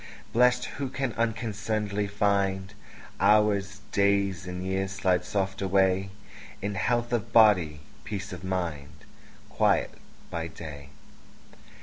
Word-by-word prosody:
Blest, 125 Hz, +1 st, +4 dB
who 135 Hz, -1 st, -4 dB
can 135 Hz, -3 st, -2 dB
unconcern'dly 110 Hz, -2 st, -1 dB
find 100 Hz, -1 st, 0 dB, 0.5 s
Hours, 100 Hz, -2 st, +3 dB
days, 100 Hz, -2 st, +1 dB
and 90 Hz, 0 st, -5 dB
years, 95 Hz, 0 st, -1 dB
slide 95 Hz, -2 st, +1 dB
soft 95 Hz, +1 st, -2 dB
away 95 Hz, 0 st, +2 dB, 0.5 s
In 100 Hz, +1 st, -3 dB
health 120 Hz, +4 st, 0 dB
of 115 Hz, -1 st, -1 dB
body, 90 Hz, -10 st, +5 dB, 0.2 s
peace 100 Hz, -1 st, -5 dB
of -, -, -8 dB
mind, 85 Hz, -8 st, -4 dB, 0.4 s
Quiet -, -, +2 dB, 0.4 s
by 85 Hz, -1 st, -3 dB
day. 75 Hz, -4 st, -9 dB
100 Hz, 110 wpm, -27 LUFS, 95-105 Hz, 0.5 s, body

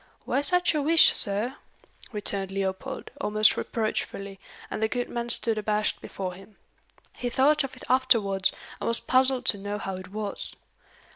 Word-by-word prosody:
"Why 275 Hz, -, +1 dB
such 360 Hz, +4 st, +3 dB
a 300 Hz, -, +1 dB
wish, 320 Hz, +3 st, +6 dB
sir?" 210 Hz, +5 st, -1 dB, 0.5 s
returned 200 Hz, -3 st, -2 dB
Leopold, 195 Hz, +7 st, -4 dB
almost 215 Hz, +1 st, +4 dB
reproachfully, 200 Hz, -3 st, -3 dB, 0.3 s
and -, -, -3 dB
the 220 Hz, -, +3 dB
good 245 Hz, +2 st, -3 dB
man 235 Hz, 0 st, -3 dB
stood 225 Hz, -2 st, +2 dB
abashed 210 Hz, 0 st, 0 dB
before 185 Hz, -2 st, -5 dB
him. 195 Hz, +3 st, -15 dB, 0.6 s
He 245 Hz, -, -3 dB
thought 290 Hz, +5 st, +3 dB
of 275 Hz, -, -6 dB
it -, -, -13 dB
afterwards, 225 Hz, -7 st, +3 dB, 0.3 s
and -, -, -3 dB
was 230 Hz, -, +3 dB
puzzled 260 Hz, -1 st, +2 dB
to 205 Hz, -, +3 dB
know 205 Hz, +1 st, -4 dB
how 195 Hz, -2 st, -4 dB
it 185 Hz, -1 st, -9 dB
was. 205 Hz, +1 st, -4 dB
215 Hz, 160 wpm, -27 LUFS, 200-255 Hz, 0.6 s, wish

